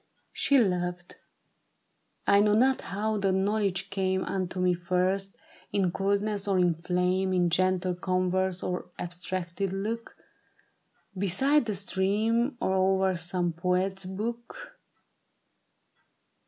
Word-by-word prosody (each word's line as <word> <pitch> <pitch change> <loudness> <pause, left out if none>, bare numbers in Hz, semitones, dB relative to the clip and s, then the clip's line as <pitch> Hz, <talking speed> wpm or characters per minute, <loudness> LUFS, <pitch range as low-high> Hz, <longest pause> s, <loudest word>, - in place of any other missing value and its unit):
She 280 - +3
loved. 180 -5 -1 1.1
I 200 - +5
know 210 0 +4
not 260 +4 +3
how 210 +2 -2
the 195 -1 +1
knowledge 195 0 0
came 190 -1 0
Unto 185 -1 -3
me 180 0 +3
first 185 +3 -1 0.2
— - - -27
in 190 -3 +1
coldness 200 +2 -1
or 195 -2 +2
in 180 -2 +3
flame, 180 +3 0
In 175 -2 +2
gentle 185 0 +1
converse 185 0 -1
or 180 0 -3
abstracted 180 +1 -4
look, 220 +4 -4 1.0
Beside 230 +10 +2
the 215 -3 -2
stream, 215 +7 0
or 190 - 0
o'er 190 0 +2
some 175 0 -1
poet's 185 +2 -1
book. 230 +5 -6
190 Hz, 115 wpm, -28 LUFS, 180-200 Hz, 1.1 s, I